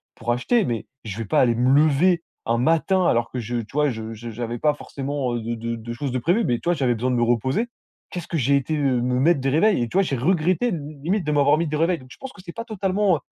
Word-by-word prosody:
pour 120 +1 -2
acheter. 195 - +2
Mais 115 -5 -3 0.2
je 105 -1 -5
vais 115 - -3
pas 100 - +2
aller 120 -2 +4
me 125 +2 +2
lever, 165 +4 +3 0.2
un 115 - +2
matin 165 +8 +2
alors 120 0 +1
que 125 - -4
je 120 +1 -3
tu 115 -1 -6
vois, 150 0 +2
je 110 -1 -6
j'avais 115 +1 -5
pas 150 -1 +3
forcément, 135 -3 -3
heu, 120 - -3
de 115 +1 -3
de 115 +1 -4
de 115 +1 -7
choses 135 +2 -3
de 130 - -1
prévu. 180 - +2
Mais, 120 - +1
tu - - -7
vois, 175 - +3
j'avais 130 -7 +1
besoin 125 +3 -1
de - - +1
me 120 - +1
reposer. 130 - +1 0.4
Qu'est-ce 175 -3 -6
que 165 - -2
j'ai 140 0 +2
été, 140 +3 -2
heu, 135 -4 +1
me 125 0 0
mettre 155 +3 +4
des 135 - +1
réveils? 160 - +3
Et - - -2
tu - - -2
vois, - - +6
j'ai 140 -7 -2
regretté 180 - +1
de 170 - -2 0.2
limite, 185 +3 0
de - - +2
m'avoir 145 0 +4
mis 170 - 0
des 150 0 -2
réveils. 170 +2 +1
Donc, 130 -1 -16
je - - -12
pense 265 -1 -8
que 200 - -14
c'est 175 - -8
pas 230 - -6
totalement, 195 -4 +1
heu, - - -10
140 Hz, 290 wpm, -23 LUFS, 120-170 Hz, 0.4 s, vois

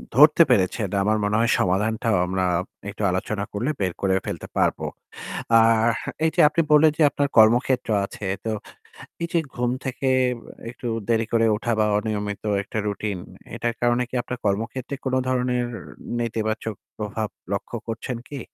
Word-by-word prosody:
ধরতে 150 +4 +8
পেরেছেন। 95 +1 +2
আমার 110 +1 +2
মনে 105 +1 +1
হয় 115 - +3
সমাধানটাও 105 +3 +1
আমরা 95 0 -1 0.4
একটু 105 - -8
আলোচনা 100 +2 -2
করলে 120 +8 -1
বের 95 -3 0
করে 95 -1 +2
ফেলতে - - -5
পারব। - - +2 0.8
আর 115 0 +4 0.4
এইযে 160 - +3
আপনি 165 +2 +2
বললেন 150 +1 +7
যে - - 0
আপনার 145 0 0
কর্মক্ষেত্র 120 +3 +4 0.2
আছে। 100 - -8 0.2
তো 110 - 0 0.7
এইযে 170 0 0 0.2
ঘুম 120 0 0
থেকে 130 +1 -3 0.6
একটু 125 0 -9 0.2
দেরি 115 -1 +2
করে 115 0 +3
ওঠা 120 +2 -1
বা 110 - +4
অনিয়মিত 105 -1 -3 0.2
একটা 110 - -5
রুটিন। 100 -2 -2 0.4
এটার 120 -1 -1
কারণে 120 +1 +3
কি - - -9
আপনার 125 0 -5
কর্মক্ষেত্রে 115 +7 -2
কোনো 130 0 +2
ধরনের 125 -1 +1 0.5
নেতিবাচক 110 -1 -2 0.2
প্রভাব 110 0 -3 0.2
লক্ষ্য - - -3
করছেন 115 +2 -3
কি? 140 -3 -6
115 Hz, 150 wpm, -24 LUFS, 105-125 Hz, 0.8 s, ধরতে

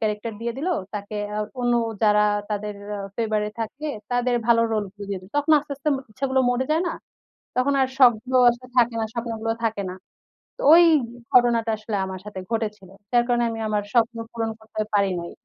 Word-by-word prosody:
Character 215 +1 -2
দিয়ে 235 0 -2
দিল, 320 +7 -2 0.3
তাকে 205 +1 -5
অ্যা 210 - -3 0.2
অন্য, 240 0 +2 0.3
যারা 210 0 +5 0.3
তাদের 210 0 -3 0.4
ফেভার 215 -2 0
এ - - -9
থাকে, 270 +7 -4 0.2
তাদের 245 0 +1
ভালো 230 -1 +5
রোল 215 -2 0
গুলো 205 -1 -9
দিয়ে 190 -2 -3
দিল। 185 +2 -16
তখন 290 +2 +2
আস্তে, 290 0 -6
আস্তে 295 +2 -2
ম - - 0
ইচ্ছেগুলো 265 +3 0
মরে 245 +1 0
যায় 320 +3 +2
না? - - -2 0.6
তখন 255 +3 +2
আর 260 - +3
শখগুলো 255 0 +4
আসলে 240 +1 -8
থাকে 235 -1 +4
না, 220 - 0
স্বপ্নগুলো 225 -1 -2
থাকে 220 -3 0
না। - - -6 0.6
তো - - -8
ওই 345 - +9 0.5
ঘটনাটা 235 -2 +4
আসলে 215 0 -4
আমার 190 -1 -6
সাথে 205 -2 -7
ঘটেছিল। 210 -4 -3 0.2
যার 240 -1 +4
কারণে 240 -1 +2
আমি 225 0 -5
আমার 210 -1 0
স্বপ্ন 230 -1 +2
পূরণ 225 -1 -2
করতে 220 0 -4
পারি 200 -1 +3
নাই। 170 - -7
225 Hz, 195 wpm, -24 LUFS, 210-245 Hz, 0.6 s, ওই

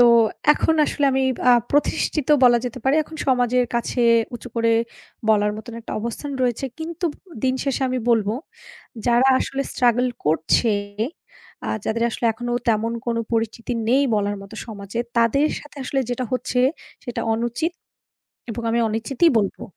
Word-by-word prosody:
তো 245 - +8 0.5
এখন 320 +1 +1
আসলে 290 - -1
আমি 265 0 +2 0.3
আ - - +8 0.2
প্রতিষ্ঠিত 290 0 +1 0.2
বলা 240 -1 +6
যেতে 250 +1 -4
পারে। 270 +2 +3
এখন 315 +1 -11
সমাজের 250 -1 +2
কাছে 235 +1 0 0.3
উঁচু 245 +1 -8
করে 230 0 +3 0.6
বলার 210 -1 +4
মত 220 - -9
একটা 225 - -8
অবস্থান 235 +6 -5
রয়েছে। 245 +2 0
কিন্তু 335 +2 -3
উন 350 -8 -17
দিন 260 0 +2
শেষে 275 -1 -1
আমি 255 0 -1
বলব 220 -3 +3 0.8
যারা 240 +2 +4
আসলে 275 0 -2
স্ট্রাগল 245 0 +3 0.2
করছে, 160 +8 +2 0.9
আ - - -2 0.2
যাদের 230 +1 0
আসলে 235 - -5
এখনো 240 +2 -4 0.2
তেমন 225 +1 +1
কোনো 230 -1 0
পরিচিতি 230 +2 -1 0.2
নেই 265 +4 +4
বলার 205 -1 0
মতো 195 +3 -11
সমাজে, 205 0 -7 0.2
তাদের 255 +6 +3
সাথে 295 - -16
আসলে 270 +1 0
যেটা 250 +1 -2
হচ্ছে 250 0 0 0.4
সেটা 245 - -4
অনুচিত, 240 +9 -1 0.8
এবং 230 +1 -5
আমি 235 - +1
অনুচিতিই 240 +9 +2
বলবো। 200 -3 -2
240 Hz, 155 wpm, -22 LUFS, 225-265 Hz, 0.9 s, তো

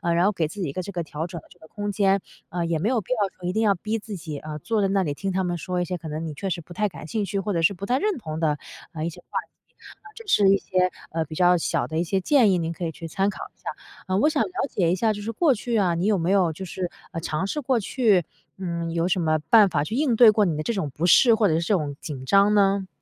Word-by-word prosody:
然 175 +2 +3
后 205 - +4
给 165 -4 0
自 205 - -9
己 175 - -1
一 - - -4
个 185 - -3
这 200 - -7
个 175 -3 -3
调 155 +1 -5
整 175 -1 -7
的 - - -20
这 - - -19
个 160 - -15
空 205 0 -4
间。 195 0 +2 0.3
呃， 175 0 -2
也 165 -1 0
没 200 +8 0
有 250 -2 +2
必 220 +5 -2
要 245 - -2 0.2
说 175 - -5
一 180 - -1
定 220 - +1
要 205 -2 +4
逼 215 +5 -3
自 215 -2 -7
己， 155 -4 -6
呃， 155 0 -7
坐 215 +7 -1
在 195 - +2
那 195 0 +2
里 150 -5 -2
听 195 +6 -3
他 190 +1 0
们 175 -1 -2
说 180 +2 -2
一 - - -1
些 180 0 -3
可 160 -2 -8
能 155 +2 -4
你 155 - -5
确 195 +6 -4
实 175 -1 -2
不 170 +1 -11
太 210 +3 0
感 165 - -10
兴 215 +4 -1
趣、 200 0 -2
或 195 +1 -2
者 170 - 0
是 165 +5 +4
不 195 +1 -7
太 250 +4 +1
认 415 +1 0
同 160 -9 -6
的 155 -2 +1 0.4
呃， 155 -1 -3
一 - - -1
些 165 - -12
话 - - -3
题。 - - -24 0.5
呃， 420 - -14
这 460 - -11
是 205 - +4
一 195 - +5
些 185 -1 +1 0.4
比 155 - -8
较 180 +1 +4
小 165 - -1
的 160 0 -2
一 - - +2
些 190 +3 -1
建 240 -1 +4
议， 185 - +2
您 165 -1 -2
可 175 - -5
以 165 - -2
去 165 +1 -8
参 195 +5 0
考 205 - -7
一 - - -40
下。 - - -6 0.4
呃， 185 0 +1
我 300 - +4
想 300 -2 0
了 - - -5 0.2
解 175 -4 +1
一 - - +2
下， 220 +3 +1
就 205 - -7
是 225 +2 -3
过 300 +3 +3
去 235 0 -2
啊， 180 -5 +2
你 170 +3 -1
有 210 -1 +3
没 175 +2 0
有 185 -5 +3
就 190 - -8
是 180 0 -4 0.2
呃， 165 - -4
尝 155 +3 -2
试 250 +10 -2
过， 255 -2 +1
去 210 -4 +2 0.3
嗯， 170 -3 -3
有 170 +1 +1
什 185 0 +1
么 155 -1 +2
办 215 0 +7
法， 145 - 0
去 215 - -4
应 270 -3 +2
对 225 -1 +8
过 210 -1 +2
你 170 -4 0
的 155 - -2
这 235 - -1
种 190 -9 -2
不 165 - -1
适， 230 +6 +6
或 215 -1 +3
者 155 - +2
是 - - +2
这 170 +5 0
种 150 -5 -2
紧 145 -6 -6
张 200 +7 +4
呢？ 195 -1 +3
185 Hz, 340 characters per minute, -24 LUFS, 165-210 Hz, 0.5 s, 对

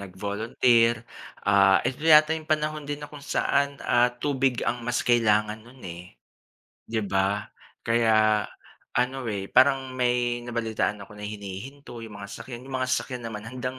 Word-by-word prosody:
nag-volunteer, 110 +4 +1 0.4
ah, 100 -1 +6
eto 130 +3 -3
yata 155 0 +6
yung 155 -1 -7
panahon 155 0 0
din 145 0 -3
na 150 - -7
kung 145 -1 -11
saan, 140 0 0
ah, 120 0 +4
tubig 135 -3 0
ang 120 0 -1
mas 120 +1 -1
kailangan 110 -2 +2
nun, 120 +3 -17
eh, 85 -4 -10 0.7
'di 110 -1 -1
ba. 100 +1 0 0.4
Kaya 110 -2 +3 0.5
ano, 125 0 0
eh, 100 -2 -3
parang 130 0 +4
may 120 -1 0
nabalitaan 115 -3 -2
ako 100 - -16
na 105 0 -7
hinihinto 105 +6 -8
yung 110 -2 -9
mga 100 0 -8
sasakyan, 125 -1 -8
yung 135 0 -4
mga 130 - -1
sasakyan 125 -1 -2
naman 105 -2 -7
handang, 125 +2 -5
120 Hz, 155 wpm, -26 LUFS, 105-130 Hz, 0.7 s, ah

